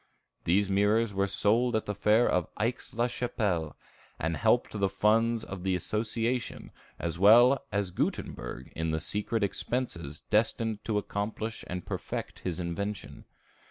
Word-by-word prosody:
These 95 +4 +3
mirrors 105 +3 +2
were 100 0 +1
sold 115 +5 +3
at 110 - 0
the 105 - -2
fair 105 +4 +3
of 90 -3 +1
Aix 115 +2 -2
la 120 +1 +2
Chapelle, 105 - -1 0.4
and 80 +1 -1
helped 115 +6 +2
the 100 -2 0
funds 110 +4 +2
of 95 -2 -7
the 95 0 0
association, 115 +6 -2 0.3
as 85 0 -3
well 120 +7 +7
as 100 -2 -1
Gutenberg 65 -7 -3
in 80 0 -1
the 80 0 0
secret 105 +5 -1
expenses 95 - -3
destined 110 0 0
to 110 -2 0
accomplish 110 +2 -3
and 90 0 -5
perfect - - -5
his 90 -2 -3
invention. 95 +3 -4
105 Hz, 145 wpm, -29 LUFS, 95-115 Hz, 0.4 s, well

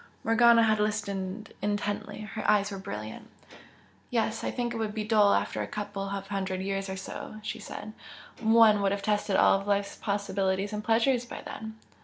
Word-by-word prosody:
Morgana 230 +1 +6
had 215 -1 +3
listened 205 -1 -2
intently, 205 0 -2
her 215 +1 -6
eyes 205 0 +3
were 195 - -5
brilliant. 110 - -7 0.8
"Yes 225 -2 0
I - - 0
think 240 -1 -2
it - - -4
would 220 -1 -2
be 215 - -1
dull 210 -1 +4
after - - -1
a - - -3
couple 205 -1 -4
of 195 0 -4
hundred 190 -2 -2
years 195 0 -2
or 190 - -4
so" 195 - -7
she 215 +1 -4
said 215 0 -8 0.5
"One 220 -2 +6
would 195 -1 +2
have 200 0 -4
tested 210 -1 +1
all 195 - +5
life's 200 0 -1
possibilities 200 -1 -1
and 210 0 -3
pleasures 235 +3 +2
by - - -7
then." 220 0 -7
210 Hz, 180 wpm, -28 LUFS, 195-220 Hz, 0.8 s, Morgana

